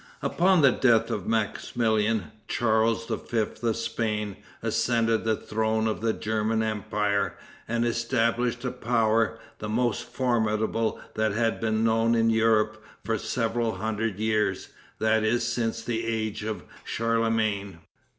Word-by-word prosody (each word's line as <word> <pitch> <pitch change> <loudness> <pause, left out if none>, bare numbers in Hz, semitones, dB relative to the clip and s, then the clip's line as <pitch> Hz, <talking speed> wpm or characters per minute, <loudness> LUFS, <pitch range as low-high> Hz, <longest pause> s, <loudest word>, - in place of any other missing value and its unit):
Upon 180 -2 +3
the 135 - +7
death 115 -2 +3
of 105 -5 -3
Maximilian, 110 -3 0 0.2
Charles 115 0 +1
V. 115 -1 -1 0.2
of 115 -2 +1
Spain 105 -3 -2 0.3
ascended 115 -2 +1
the 110 -1 +2
throne 110 +1 -1
of 110 -1 -1
the 115 0 +2
German 110 +1 0
empire, 105 -1 -1 0.3
and 120 +1 0
established 120 +1 0
a 125 - 0
power, 115 -2 +1 0.2
the 105 - -5
most 120 +1 +1
formidable 115 -2 0
that 110 -1 0
had 115 +1 0
been 110 -1 +1
known 115 +1 +3
in 115 0 +3
Europe 110 -1 +2 0.2
for 110 0 0
seven 115 0 -1
hundred 110 +1 -2
years, 110 0 0 0.3
that 110 0 +2
is, 115 +2 +1
since 115 -1 -1
the 115 -1 -2
age 110 -2 -2
of 105 -4 -4 0.2
Charlemagne. 110 -4 0
110 Hz, 130 wpm, -26 LUFS, 110-115 Hz, 0.3 s, the